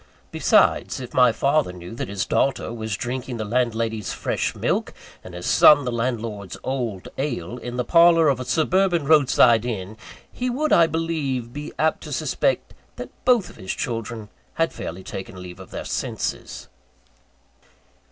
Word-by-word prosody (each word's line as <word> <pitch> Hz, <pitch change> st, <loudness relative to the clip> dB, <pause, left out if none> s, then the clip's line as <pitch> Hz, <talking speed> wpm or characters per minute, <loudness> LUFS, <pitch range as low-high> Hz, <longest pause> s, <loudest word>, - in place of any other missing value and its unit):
Besides, -, -, +2 dB
if 125 Hz, -2 st, -8 dB
my 125 Hz, -2 st, +5 dB
father 140 Hz, -1 st, +1 dB
knew 90 Hz, +1 st, -10 dB
that 115 Hz, -, -4 dB
his 100 Hz, 0 st, -2 dB
daughter 135 Hz, -4 st, 0 dB
was 110 Hz, -3 st, -4 dB
drinking 125 Hz, 0 st, -4 dB
the 110 Hz, -, -3 dB
landlady's 115 Hz, -3 st, -1 dB
fresh -, -, -2 dB
milk, -, -, -1 dB, 0.3 s
and 90 Hz, -, -10 dB
his 90 Hz, -, -7 dB
son 145 Hz, -3 st, +6 dB
the 125 Hz, -, -1 dB
landlord's 115 Hz, -5 st, -3 dB
old 120 Hz, -8 st, -3 dB
ale, 125 Hz, -, -3 dB
in 120 Hz, +1 st, -6 dB
the 125 Hz, -, 0 dB
parlour 165 Hz, 0 st, +6 dB
of 135 Hz, -3 st, +2 dB
a 130 Hz, -, -5 dB
suburban 175 Hz, +1 st, +2 dB
roadside 135 Hz, -6 st, +5 dB
inn, 110 Hz, -3 st, -5 dB, 0.4 s
he 250 Hz, 0 st, -2 dB
would, 290 Hz, +5 st, 0 dB
I 165 Hz, -1 st, +6 dB
believe, 145 Hz, -7 st, -2 dB
be 150 Hz, +1 st, -6 dB
apt 160 Hz, 0 st, +1 dB
to -, -, -8 dB
suspect -, -, -1 dB, 0.2 s
that -, -, -8 dB
both 240 Hz, -8 st, +2 dB
his 95 Hz, -, -5 dB
children 115 Hz, -2 st, -4 dB, 0.3 s
had 165 Hz, 0 st, 0 dB
fairly 90 Hz, +3 st, -7 dB
taken 95 Hz, -1 st, -7 dB
leave 90 Hz, 0 st, -10 dB
of 95 Hz, -, -11 dB
their -, -, -6 dB
senses. -, -, -4 dB
125 Hz, 160 wpm, -23 LUFS, 110-150 Hz, 0.4 s, son